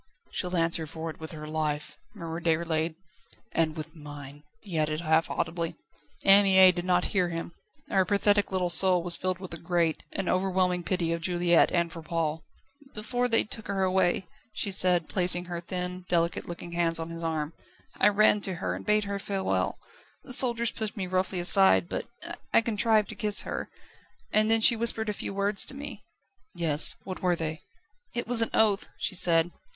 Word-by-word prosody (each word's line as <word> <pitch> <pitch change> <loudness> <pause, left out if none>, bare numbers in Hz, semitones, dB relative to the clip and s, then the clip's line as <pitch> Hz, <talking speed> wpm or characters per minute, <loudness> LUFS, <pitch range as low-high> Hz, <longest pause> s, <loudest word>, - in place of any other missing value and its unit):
"She'll 180 -1 -2
answer 165 -1 +1
for 160 +1 -6
it - - -16
with 160 0 -7
her 150 -1 -9
life," 155 -1 -3 0.2
murmured 165 -2 -7
Déroulède. 160 -1 -1 0.6
"And 160 -1 -1
with 155 +2 -8
mine!" 145 -2 -11 0.2
he 180 -6 -4
added 155 +1 -1
half 160 -1 +1
audibly. 165 0 -3 0.5
Anne 195 +1 +7
Mie 190 -1 +6
did 175 0 -6
not 180 -1 +1
hear 180 -3 +1
him; 165 0 -6 0.4
her 190 -1 +3
pathetic 205 +1 +1
little 180 -2 0
soul 180 -1 +6
was 175 -1 +5
filled 185 0 -3
with 185 -2 -9
a 170 - -8
great, 170 -2 -1
an 195 - -4
overwhelming 185 -1 0
pity 170 -2 -1
of 170 - -4
Juliette 175 -1 +2
and 170 -1 0
for 165 - -9
Paul. 160 -1 -3 0.5
"Before 245 +3 -2
they 230 -2 +3
took 220 +1 -6
her 195 -1 -1
away," 185 0 +1 0.3
she 200 - -1
said, 180 -3 +2
placing 180 -1 +1
her 175 -1 -6
thin, 180 +1 -5
delicate 170 -1 -1
looking 170 0 -8
hands 170 -1 +1
on 165 0 -5
his 165 0 -8
arm. 160 -1 -3 0.5
"I 200 - +5
ran 210 0 +3
to 190 -2 +2
her, 170 - -3
and - - -7
bade 210 0 +1
her 200 0 -4
farewell. 195 -1 -2 0.5
The 255 - +1
soldiers 235 -2 +5
pushed 220 -1 -6
me 190 - -3
roughly 185 0 -1
aside; 175 - +6
but - - -5 0.4
I - - +5
contrived 220 -1 +1
to - - -7
kiss 210 -1 +2
her - - -5 0.6
and 215 0 +3
then 225 0 +3
she 235 - +5
whispered 225 -1 -1
a - - -1
few - - -6
words 200 0 +1
to 270 - -4
me." 285 +1 -8 0.5
"Yes? 160 -3 +5
What 185 -1 -8
were 180 -1 +1
they?" 160 -1 -5 0.5
"'It 240 - -3
was 240 -1 +5
an 225 - 0
oath,' 215 -2 +1
she - - -4
said. 170 -2 +4
180 Hz, 190 wpm, -27 LUFS, 165-200 Hz, 0.6 s, Anne